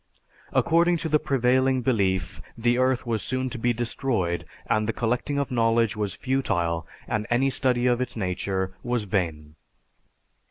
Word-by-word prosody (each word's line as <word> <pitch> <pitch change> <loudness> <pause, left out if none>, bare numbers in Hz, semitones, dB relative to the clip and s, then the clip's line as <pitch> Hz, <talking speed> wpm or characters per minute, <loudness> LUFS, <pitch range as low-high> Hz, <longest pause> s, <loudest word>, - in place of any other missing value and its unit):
According 170 +1 +3
to 160 - -3
the 150 0 +3
prevailing 130 -2 +2
belief 100 -7 0 0.2
the 120 +2 +2
earth 130 -1 +2
was 115 -3 -1
soon 130 +2 -1
to 125 - -5
be 120 +1 +2
destroyed 115 -6 -1 0.2
and 110 0 +1
the - - +1
collecting 120 +4 -1
of 140 -2 -1
knowledge 115 -2 +2
was 105 -3 -2
futile 85 - -1 0.2
and 105 0 -2
any 130 +3 +2
study 125 -1 +2
of 125 0 +2
its 125 -2 -4
nature 95 -1 -2
was 120 -2 -1
vain. 80 -7 -2
120 Hz, 155 wpm, -25 LUFS, 100-130 Hz, 0.2 s, According